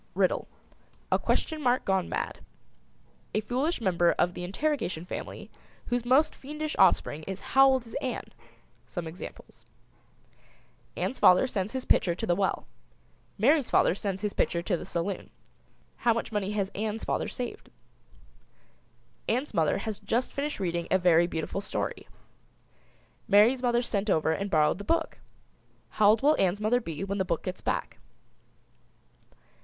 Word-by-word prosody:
RIDDLE. - - +1 0.6
A - - +3
question 315 -2 -1
mark 250 -1 +1
gone 190 -2 +1
mad. - - -3 1.0
A - - +3
foolish 260 +10 -1
member 175 -5 +2
of 175 - +1
the 175 - -6
Interrogation 185 - -2
family - - -7 0.4
whose 245 -1 -1
most 265 +5 +4
fiendish 300 +2 -5
offspring 150 - +3
is 190 0 -4
"How 270 0 +8
old 260 -2 +2
is 230 - -13
Ann?" 255 -3 -3 0.6
Some 175 +6 -5
examples: 160 +3 -10 1.3
Ann's 265 - -2
father 180 +7 +6
sends 210 -3 -3
his 260 -1 -3
pitcher 170 -2 +2
to - - -4
the 175 - +2
well; 195 0 -1 0.7
Mary's 275 +6 +3
father - - +4
sends 195 0 -4
his 210 - -1
pitcher 170 0 0
to 180 - 0
the - - -7
saloon; 180 +3 -3 0.7
how 235 -2 +2
much 230 - -3
money 205 -2 -1
has 200 -2 -1
Ann's 215 +1 -3
father - - -1
saved? 245 -1 -6 1.6
Ann's 255 +4 -1
mother 160 -5 +2
has 210 0 -4
just 245 +3 -1
finished 290 -1 -3
reading 170 -2 -2
a 190 - +4
very 175 -2 +4
beautiful 165 +4 -3
story. - - -4 1.2
Mary's 220 +6 +5
mother 240 -1 +2
sent 210 -2 -1
over 160 -3 +2
and 200 +5 -2
borrowed 155 0 +2
the - - -6
book. 330 +8 -1 0.7
How 210 -1 +4
old 220 +4 +3
will 300 +2 +5
Ann's 190 +1 +2
mother 225 +4 +2
be 165 -4 -5
when 200 +1 -3
the - - +3
book 170 -3 -2
gets 185 - -5
back? - - -3
205 Hz, 155 wpm, -28 LUFS, 180-250 Hz, 1.6 s, How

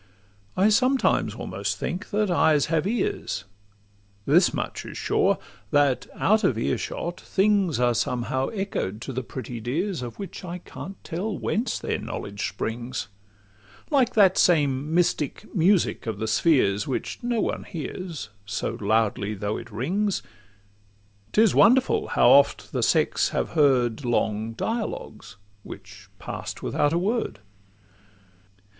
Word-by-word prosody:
I 195 +3 +5
sometimes 255 +5 +2
almost - - -3
think 185 +3 -4
that 210 -2 0
eyes 155 -4 +4
have 160 +3 +2
ears: 210 - -2 0.8
This - - +5
much - - -4
is - - -8
sure, - - +2 0.3
that, 145 -3 +2
out 215 +2 +3
of 130 - +2
earshot, 170 +8 -3
things 195 - +2
Are 120 -1 +3
somehow 125 +3 -1
echoed 195 - -3
to 135 - -5
the 130 - -2
pretty 125 -1 -7
dears, 160 - -2
Of 120 -2 -7
which 195 0 -7
I 180 0 -5
can't 190 +2 -9
tell 190 +4 -3
whence 230 +4 -1
their - - -2
knowledge 100 0 -4
springs. 120 -1 -4 0.8
Like 260 -4 +3
that 195 -4 +5
same 145 -4 +3
mystic 165 -4 0
music 180 - +2
of 110 -3 -2
the 110 - -3
spheres, 110 - +2
Which 130 - -3
no 240 -1 0
one - - -2
bears, 165 - -6
so 100 +1 -3
loudly 105 0 +1
though 105 +1 -2
it 115 - -9
rings, 180 - -1 1.1
'Tis 220 0 +4
wonderful 265 - +4
how - - +3
oft - - +4
the - - -1
sex - - +2
have - - -1
heard 135 -5 +2
Long 115 -2 0
dialogues—which 100 - -7
pass'd - - -6
without 145 -1 +1
a 165 - +1
word! 215 +7 -1
150 Hz, 135 wpm, -25 LUFS, -, 1.1 s, I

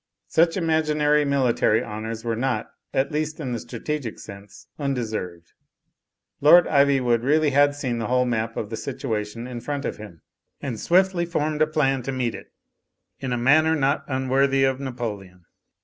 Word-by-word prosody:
Such 165 +2 +3
imaginary 155 -3 +2
military 125 -5 +2
honours 110 +1 -6
were 115 -1 0
not, 120 -2 -2 0.2
at 135 +1 0
least 155 +1 -2
in 135 -5 -4
the 120 - -2
strategic 125 +1 -5
sense, 100 0 -12
undeserved. 110 - -4 0.9
Lord 165 +4 +7
Ivywood 135 -5 +3
really 150 +3 +2
had 145 +1 +4
seen 130 -5 -3
the 115 - -2
whole 125 0 +2
map 115 -2 -2
of 110 0 -4
the 110 - -3
situation 115 -4 -4
in 125 -2 -6
front 145 +1 -4
of - - -3
him, 105 -7 -12 0.4
and 125 -6 -5
swiftly 180 -1 +2
formed 155 -2 -1
a 155 - +5
plan 135 -4 +1
to 135 - -4
meet 125 -3 -1
it, - - -11 0.7
in 130 -2 -4
a 120 - 0
manner 155 +6 +4
not 140 -1 +1
unworthy 135 +1 +1
of 135 -1 +1
Napoleon. 105 -9 -6
135 Hz, 165 wpm, -24 LUFS, 115-150 Hz, 0.9 s, Lord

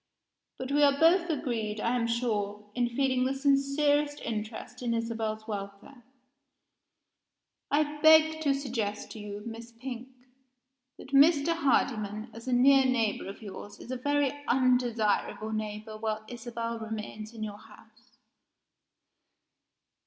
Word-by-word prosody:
"But 260 +1 -5
we 290 +1 +3
are 280 -1 +4
both 345 +2 +5
agreed, 225 -8 -2
I 230 +3 0
am 235 -2 0
sure, 210 -3 -2
in 245 0 0
feeling 255 +1 +1
the 265 +1 0
sincerest 285 +1 +2
interest 220 +3 -5
in 235 -2 0
Isabel's 225 -1 -3
welfare. 200 +5 -7 1.7
I 295 0 +1
beg 315 0 +6
to 285 -3 +2
suggest 230 -7 -3
to 220 - -8
you, 205 0 -7
Miss 230 +1 -8
Pink, 245 +1 -7 0.9
that 260 - -12
Mr. 290 +3 +5
Hardyman, 225 -7 0
as 230 +2 -11
a - - -1
near 270 +2 +6
neighbor 235 -7 0
of 200 +3 -9
yours, 205 0 -9
is 245 - -9
a - - -1
very 285 +1 +1 0.2
undesirable 240 -4 +1
neighbor 215 0 -4
while 215 0 -3
Isabel 235 -1 -5
remains 215 -1 -6
in 220 - -5
your 205 -1 -6
house." 220 +2 -19
235 Hz, 130 wpm, -29 LUFS, 215-275 Hz, 1.7 s, beg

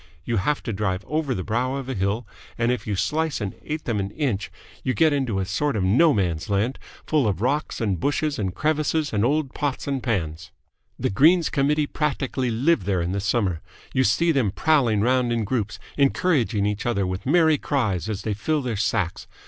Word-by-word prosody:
You 115 - 0
have 145 +10 0
to 115 - -3
drive 95 -1 -2
over 150 -4 -1
the 95 - -3
brow 125 +6 -1
of 135 -2 -5
a 130 - -2
hill, 100 +3 -1 0.3
and 115 +1 +2
if 125 - -3
you 105 - 0
slice 155 +9 0
an 100 -3 -3
eighth 155 0 -5
of 115 -4 0
an 100 0 -2
inch 110 -5 -2 0.3
you 130 - 0
get 160 -2 +4
into 130 -8 0
a 95 - -1
sort 140 +9 -1
of 100 - 0
No 125 - +5
Man's 85 - -1
Land, 105 +6 0 0.3
full 150 -7 +2
of 95 -4 -1
rocks 140 +7 -1
and 100 -6 0
bushes 145 - 0
and 95 -3 -2
crevices 155 +1 0
and 105 -1 +1
old 140 +2 +1
pots 145 -3 -2
and 135 -2 -1
pans. 85 -9 -2 0.5
The - - -1
Greens 160 - +4
Committee 150 +2 +2
practically 135 -4 -1
live 120 - +2
there 95 -3 +1
in 85 - -2
the 100 - -1
summer. 95 -5 0 0.3
You 130 - +3
see 170 +5 +3
them 135 -9 +2
prowling 120 -3 +2
round 125 +1 +2
in 115 -1 0
groups, 105 -1 -2 0.2
encouraging 135 - +2
each 105 +2 -2
other 100 -5 +1
with 95 +5 -4
merry 160 -1 +4
cries 110 - -1
as 105 -2 -3
they 110 - -1
fill 150 +8 -1
their 120 -3 -2
sacks. 100 -4 -1
120 Hz, 205 wpm, -24 LUFS, 100-145 Hz, 0.5 s, No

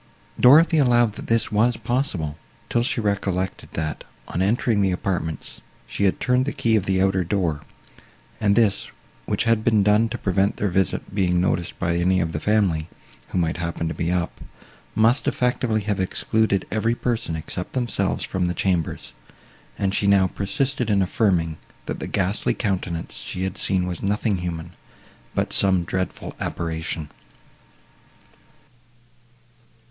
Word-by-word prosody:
Dorothée 155 +5 +7
allowed, 120 -3 +4
that - - -9
this 115 -1 +1
was 115 +3 +2
possible, 110 - -2 0.3
till 120 - +2
she 120 - 0
recollected, 100 -3 -2
that, 80 -1 -3 0.2
on 90 - -2
entering 105 +1 +2
the 95 -1 +2
apartments, 90 -3 -3 0.2
she 100 - -1
had 95 - +1
turned 125 +1 +2
the 145 - -1
key 115 -1 +1
of 100 -4 0
the 95 -1 +2
outer 95 -1 +2
door, 85 -4 -1 0.8
and 100 -1 +3
this, 105 -3 +2 0.4
which - - 0
had 115 -2 +2
been 110 -3 +3
done 105 +3 +3
to 120 - -4
prevent 95 0 +1
their 105 - 0
visit 95 +1 -1
being 90 -3 +2
noticed 90 -1 -1
by 85 -2 0
any 90 +2 +2
of 80 -2 -1
the 75 - -3
family, 90 -6 +1 0.4
who - - -4
might 80 -2 0
happen 85 -1 -3
to 80 - -2
be 85 +1 -1
up, 90 -1 -2 0.5
must 115 +5 +3
effectually 125 -3 +1
have 105 -1 -2
excluded 100 +2 +1
every 115 +2 +1
person, 115 -9 -2
except 85 +3 -5
themselves, 120 -4 -1
from 90 -2 -1
the 90 - -2
chambers; 90 -3 -1 0.6
and 95 -1 0
she 100 - +1
now 100 -1 +5
persisted 125 +6 -1
in 100 -2 +3
affirming, 90 -5 +1 0.3
that - - -4
the - - -5
ghastly 100 +1 0
countenance 95 -6 -2
she 90 - -5
had 95 -1 -2
seen 95 -2 +2
was 90 -2 -4
nothing 105 +1 0
human, 85 -1 -5 0.6
but - - 0
some 95 -3 +4
dreadful 95 +2 -4
apparition. 80 -2 -3
95 Hz, 155 wpm, -23 LUFS, 90-110 Hz, 0.8 s, Dorothée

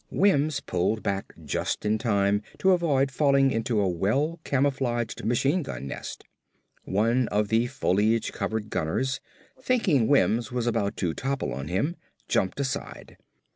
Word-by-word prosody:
Wims 155 -7 +2
pulled 95 +5 -1
back 100 -1 -2
just 70 - -2
in 110 +1 +1
time 100 -3 +2 0.2
to 190 - +3
avoid 145 -7 +2
falling 140 -1 +3
into 115 -1 0
a 100 - +2
well 130 - 0
camouflaged 130 -6 0
machine 135 - +1
gun 130 - -6
nest. 65 - -7 0.6
One 115 +5 +2
of 105 0 0
the 115 +2 +2
foliage 110 -3 +1
covered 110 -1 -3
gunners, 130 +12 -1 0.4
thinking 190 - +2
Wims 120 -4 +2
was 125 -1 -1
about 105 -4 0
to 85 -4 -1
topple 135 - -2
on 70 +3 -5
him, 100 - -1 0.3
jumped 95 +8 0
aside. 135 -2 -4
120 Hz, 140 wpm, -26 LUFS, 105-140 Hz, 0.6 s, to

